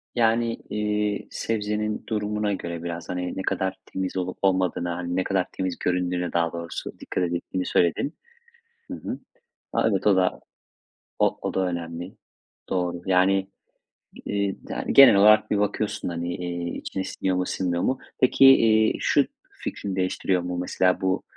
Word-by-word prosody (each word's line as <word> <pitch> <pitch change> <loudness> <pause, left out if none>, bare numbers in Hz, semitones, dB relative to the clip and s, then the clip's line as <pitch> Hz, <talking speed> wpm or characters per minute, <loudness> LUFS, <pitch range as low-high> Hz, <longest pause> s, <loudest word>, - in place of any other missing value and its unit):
Yani, 115 0 +2
iii, 105 -1 -1
sebzenin 105 -1 -2
durumuna 105 -1 -1
göre 85 -3 -5
biraz, 85 -1 -5
hani, 90 0 -3
ne - - -1
kadar 95 0 -1
temiz 95 0 -4
olup 90 0 -3
olmadığına, 90 -2 +1
hani, 90 0 -3
ne 95 - +1
kadar 95 -2 0
temiz 95 -2 -3
göründüğüne 90 -1 -1
daha 85 -1 +1
doğrusu 85 0 -6
dikkat 90 - -2
ettiğini 90 +1 -3
söyledin. 90 - +1 0.7
Hı - - -3
hı. - - -6 0.5
A, - - +3
evet, 100 -1 0
o 100 - +6
da 95 -1 +1 0.8
o - - +2
o - - -3
da - - 0
önemli. 85 +1 -5 0.5
Doğru. 90 -1 -1
Yani, 95 +1 +3 0.8
ııı, 100 -1 -2
da - - -4
genel 135 -5 +9
olarak 105 +2 +6
bir 105 - +2
bakıyorsun, 105 0 -1
hani, 85 0 -3
iii, 85 -1 -4
içine 95 - -4
siniyor 95 -1 -1
mu, 90 0 0
sinmiyor 90 -2 -1
mu? 130 0 +1 0.2
Peki, 130 +1 +5
iii, 110 -4 +6
şu - - +3 0.3
fikrini 95 -2 -5
değiştiriyor 90 -1 0
mu? 90 0 -3
Mesela 90 +1 +1
bu 95 0 0
95 Hz, 155 wpm, -25 LUFS, 90-105 Hz, 0.8 s, genel